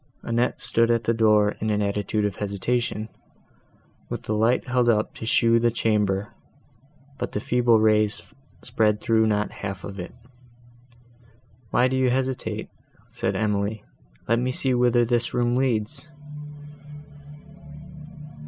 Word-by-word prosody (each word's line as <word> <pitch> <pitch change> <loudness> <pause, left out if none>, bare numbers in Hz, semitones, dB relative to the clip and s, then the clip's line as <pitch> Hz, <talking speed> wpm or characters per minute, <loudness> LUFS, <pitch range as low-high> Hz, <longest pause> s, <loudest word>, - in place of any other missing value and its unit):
Annette 120 +2 0
stood 115 0 +2
at 115 -1 +2
the 115 - +1
door, 105 -2 +3
in 110 - -1
an 105 -1 +1
attitude 105 +1 -1
of 100 -2 -3
hesitation, 110 +2 -2 1.0
with - - -5
the 110 - -2
light 115 +5 +1
held 125 -1 +2
up 110 -2 +1
to 110 - -7
show 115 0 +4
the 120 0 +3
chamber, 105 -3 0 0.9
but - - -4
the - - -1
feeble 120 0 +3
rays 110 -1 +1 0.3
spread 110 -4 +1
through 110 0 +2
not 105 -1 0
half 95 -3 -6
of 100 -1 -7
it. 90 +5 -7 1.5
"Why 125 +4 +3
do 130 - -1
you 130 -1 +2
hesitate?" 130 0 -2 0.4
said - - -2
Emily, 105 0 -1 0.4
"let 115 +1 +2
me 125 +1 -1
see 130 0 +1
whither 120 -1 +3
this 120 0 -1
room 120 0 +1
leads." 130 +3 -1
115 Hz, 135 wpm, -24 LUFS, 105-120 Hz, 1.5 s, show